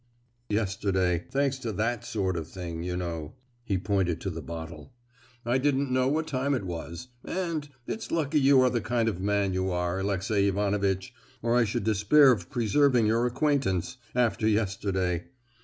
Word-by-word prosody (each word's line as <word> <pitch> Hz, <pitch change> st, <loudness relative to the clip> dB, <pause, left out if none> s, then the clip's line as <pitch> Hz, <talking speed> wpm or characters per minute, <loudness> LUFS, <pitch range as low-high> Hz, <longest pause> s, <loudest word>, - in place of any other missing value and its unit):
Yesterday, 95 Hz, -4 st, 0 dB
thanks 135 Hz, -1 st, 0 dB
to 120 Hz, -4 st, -3 dB
that 115 Hz, +4 st, -1 dB
sort 95 Hz, -4 st, -1 dB
of 80 Hz, -2 st, -4 dB
thing, 85 Hz, -2 st, -6 dB
you 90 Hz, +1 st, -3 dB
know," 85 Hz, -4 st, -4 dB, 0.3 s
(he 100 Hz, -5 st, 0 dB
pointed 95 Hz, -3 st, 0 dB
to 95 Hz, -, -3 dB
the 80 Hz, 0 st, -6 dB
bottle), 80 Hz, +6 st, -8 dB, 0.5 s
"I 120 Hz, +2 st, +2 dB
didn't 140 Hz, -1 st, +1 dB
know 130 Hz, 0 st, +2 dB
what 155 Hz, +3 st, +1 dB
time 140 Hz, -1 st, 0 dB
it 120 Hz, -, -3 dB
was, 85 Hz, -, -6 dB
and—it's 160 Hz, -, -4 dB
lucky 155 Hz, -2 st, +1 dB
you 135 Hz, -1 st, +6 dB
are 130 Hz, -1 st, +4 dB
the 120 Hz, -, 0 dB
kind 115 Hz, -1 st, 0 dB
of 95 Hz, -5 st, -2 dB
man 100 Hz, -1 st, +1 dB
you 95 Hz, +1 st, 0 dB
are, 90 Hz, +1 st, -1 dB
Alexey 100 Hz, +1 st, +1 dB
Ivanovitch, 100 Hz, +1 st, 0 dB, 0.3 s
or 115 Hz, 0 st, +2 dB
I 120 Hz, -1 st, +4 dB
should 105 Hz, -, -2 dB
despair 110 Hz, +7 st, +5 dB
of 95 Hz, -8 st, -1 dB
preserving 125 Hz, +1 st, +3 dB
your 115 Hz, +3 st, +2 dB
acquaintance, 130 Hz, -, 0 dB, 0.2 s
after 115 Hz, -3 st, +2 dB
yesterday! 95 Hz, -5 st, 0 dB
105 Hz, 165 wpm, -28 LUFS, 95-130 Hz, 0.5 s, you